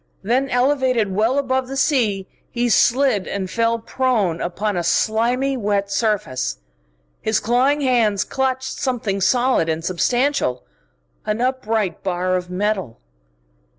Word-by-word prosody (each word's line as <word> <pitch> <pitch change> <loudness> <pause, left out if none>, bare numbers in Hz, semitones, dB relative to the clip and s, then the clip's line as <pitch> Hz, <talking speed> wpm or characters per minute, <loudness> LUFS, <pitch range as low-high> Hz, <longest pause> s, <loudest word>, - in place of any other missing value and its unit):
Then, 255 +6 +1
elevated 255 -5 +1
well 225 +7 +1
above 260 -2 0
the 270 +1 -5
sea, 220 -10 +1 0.2
he 240 0 -1
slid 240 -3 +3
and 195 -2 -3
fell 230 0 +1
prone 225 -8 0
upon 200 +4 -2
a 175 - -1
slimy 240 +9 +1
wet 200 -4 -1
surface. 195 - -1 0.6
His 220 - +1
clawing 260 +6 +2
hands 230 -7 +2
clutched 265 0 -2
something 225 -7 -2
solid 245 -6 +2
and 160 +1 -2
substantial, 240 - 0 0.6
an 215 +1 -2
upright 225 -7 -1
bar 185 -1 -1
of 180 -1 -3
metal. 190 - -2
225 Hz, 125 wpm, -20 LUFS, 195-260 Hz, 0.6 s, slid